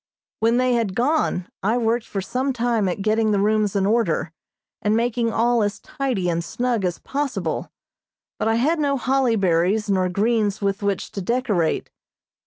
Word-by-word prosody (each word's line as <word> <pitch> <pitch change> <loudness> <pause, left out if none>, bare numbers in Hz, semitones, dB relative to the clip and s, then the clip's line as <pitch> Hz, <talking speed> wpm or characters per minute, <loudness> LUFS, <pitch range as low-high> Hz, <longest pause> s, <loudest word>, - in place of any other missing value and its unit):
When 230 +2 +3
they 255 0 +2
had 225 -6 0
gone 245 - +1
I 220 +5 +1
worked 230 0 0
for 195 - -3
some 260 +7 -1
time 235 -5 +1
at 195 +2 -3
getting 220 +1 +2
the 205 -2 +2
rooms 210 0 +1
in 195 -1 +2
order, 200 -7 +1 0.5
and 210 +1 +2
making 235 0 0
all 235 +1 +2
as 205 -1 -1
tidy 250 -10 -2
and 170 -1 0
snug 240 +2 -1
as 180 -2 -1
possible, 280 -1 -3 0.7
but - - 0
I 225 - +2
had 305 +8 +1
no 280 -2 +1
holly 260 -2 +1
berries 195 +3 +1
nor 185 -1 +2
greens 210 +1 +1
with 200 0 -1
which 200 -2 -2
to 200 - -5
decorate. 205 -6 0
220 Hz, 175 wpm, -22 LUFS, 195-245 Hz, 0.7 s, When